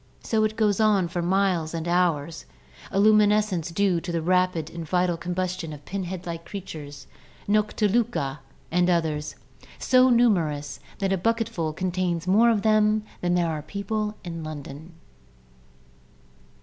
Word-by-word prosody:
So 220 -1 +1
it 215 0 -2
goes 210 -2 +1
on 205 -5 +3
for 175 0 -2
miles 180 -3 +1
and 165 0 -4
hours 170 - 0 0.2
— - - -19
a 195 - 0
luminescence 210 -4 +3
due 180 -1 +1
to 175 - -5
the 165 -1 -2
rapid 180 -2 +1
vital 175 +1 0
combustion 180 -1 -3
of 145 -1 -12
pinhead 185 -2 -5
like 165 -1 -5
creatures 150 -8 -8 0.4
(Nocliluca 210 - +1 0.3
and 180 +1 +2
others), 160 -3 -1 0.4
so 255 0 +4
numerous 170 - +1 0.2
that 195 -1 0
a 190 - 0
bucketful 225 -6 -1
contains 180 -1 -2
more 215 +6 +5
of 220 -3 +1
them 215 0 +3 0.2
than 175 0 +1
there 175 -1 +2
are 155 -2 -3
people 210 +5 -3
in 165 -2 -6
London. 155 +1 -8
180 Hz, 140 wpm, -25 LUFS, 165-210 Hz, 0.4 s, more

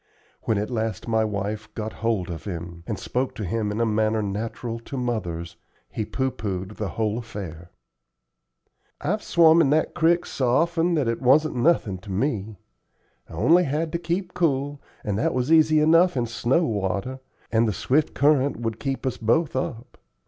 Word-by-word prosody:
When 110 - +1
at 105 +4 -2
last 110 -4 -2
my 110 -1 +2
wife 105 +1 -3
got 110 0 -4
hold 105 -6 0
of 80 -2 -7
him, 85 -3 -6
and 105 - -2
spoke 130 +6 -2
to 105 - -4
him 105 +2 -1
in 105 - -3
a 115 - +3
manner 110 0 +1
natural 115 +3 -4
to 135 +4 -7
mothers, 90 -9 -3 0.3
he 110 - -3
pooh 130 +3 -1
poohed 95 -2 -5
the 105 -3 -3
whole 110 0 0
affair. 90 -7 -8 1.3
"I've 210 +4 -1
swum 165 -1 +5
in 140 - +3
that 155 +2 +2
crick 170 +1 +2
so 130 -3 -1
often 170 +5 +2
that 145 -6 +1
it 115 - -1
was 135 +5 +5
nothin' 125 - +1
to 100 +1 -10
me. 105 -1 -2 0.7
I - - -11
only 170 - +4
had 155 +3 -1
to 170 - -2
keep 175 +2 -2
cool, 145 -4 0 0.2
and 105 -2 -1
that - - 0
was 130 +4 0
easy 155 -1 +5
enough 165 +1 +4
in 120 - +1
snow 120 +7 +1
water, 105 - -2 0.3
and 115 0 +3
the - - +1
swift 140 +9 0
current 145 -1 +3
would 115 -1 -3
keep 135 -1 -3
us 130 - -1
both 135 +8 +1
up. 125 -2 -4
115 Hz, 180 wpm, -24 LUFS, 105-150 Hz, 1.3 s, swum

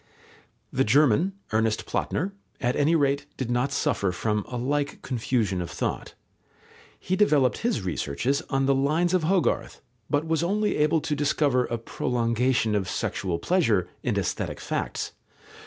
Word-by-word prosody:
The 135 - +3
German, 145 - +3 0.2
Ernest 110 0 +1
Platner, 185 +6 -1 0.3
at 125 0 0
any 155 +3 +3
rate 140 -1 +1
did 125 -2 -3
not 125 +3 +1
suffer 100 -8 0
from 105 +3 -1
a 125 - -5
like 145 +4 -1
confusion 115 -6 0
of 85 - -4
thought. 90 - -3 0.8
He 185 - -1
developed 150 -10 +3
his 230 - 0
researches 95 - -1
on 135 -1 +1
the 140 - +4
lines 155 +6 +1
of 180 -4 +2
Hogarth, 185 +1 +1 0.3
but 145 +2 +1
was 160 0 +1
only 205 +4 +1
able 150 +1 +3
to 155 -1 -1
discover 140 -3 +2
a 120 - -2
prolongation 115 0 0
of 100 -3 0
sexual 90 -3 -2
pleasure 110 - +1
in - - -1
aesthetic - - -2
facts. - - -3
135 Hz, 150 wpm, -26 LUFS, 115-155 Hz, 0.8 s, the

